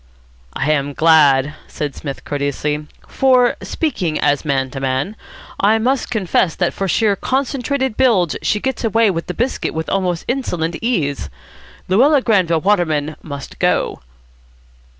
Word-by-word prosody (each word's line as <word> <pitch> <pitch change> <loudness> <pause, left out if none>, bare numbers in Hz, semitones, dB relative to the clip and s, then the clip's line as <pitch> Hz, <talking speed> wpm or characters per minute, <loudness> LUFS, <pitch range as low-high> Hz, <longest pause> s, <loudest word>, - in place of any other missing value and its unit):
"I 145 +3 0
am 145 -1 0
glad," 145 -3 +4
said 145 -2 -4
Psmith 140 -1 -7
courteously. 145 +1 -2 0.2
"For, 255 -2 +3
speaking 185 - -2
as 145 0 +1
man 135 -3 -1
to 135 - -5
man, 135 +10 -2 0.4
I 215 +3 +4
must 255 +4 0
confess 190 -6 +1
that 180 - 0
for 195 - -2
sheer, 205 +2 +2
concentrated 265 0 -1
bilge 205 - +3
she 210 - 0
gets 265 +3 -3
away 225 -1 +3
with 165 -2 -4
the 180 - -4
biscuit 245 -7 -2
with 160 0 -3
almost 180 -3 -1
insolent 175 -11 -2
ease. 165 - -1 0.6
Luella 265 +9 +4
Granville 180 -8 +2
Waterman 160 -6 +1
must 140 -3 -8
go." - - 0
180 Hz, 140 wpm, -18 LUFS, 150-230 Hz, 0.6 s, glad